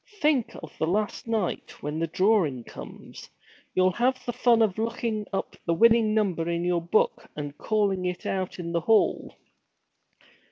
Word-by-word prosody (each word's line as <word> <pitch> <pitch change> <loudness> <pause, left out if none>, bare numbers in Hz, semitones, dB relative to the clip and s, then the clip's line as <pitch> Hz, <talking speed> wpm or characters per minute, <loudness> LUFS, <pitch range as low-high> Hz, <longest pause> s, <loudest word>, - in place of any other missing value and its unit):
'Think 295 -7 +1
of 160 - -10
the 160 - +1
last 210 +5 -1
night, 220 -6 -3
when 150 +2 -3
the 165 - 0
drawing 170 - +2
comes! - - -11 0.5
You'll 185 0 +4
have 255 +6 0
the 240 - -2
fun 230 -2 +4
of 215 -1 0
looking 225 -2 -2
up 195 - -3
the 170 - +2
winning 225 +2 +4
number 180 -6 0
in 170 0 -1
your 175 -1 +1
book 170 +6 0
and 145 -1 -5
calling 200 -4 0
it 180 0 -3
out 190 -1 -2
in 170 -2 -5
the 170 0 0
hall.' 220 +5 +2
195 Hz, 165 wpm, -26 LUFS, 170-225 Hz, 0.5 s, You'll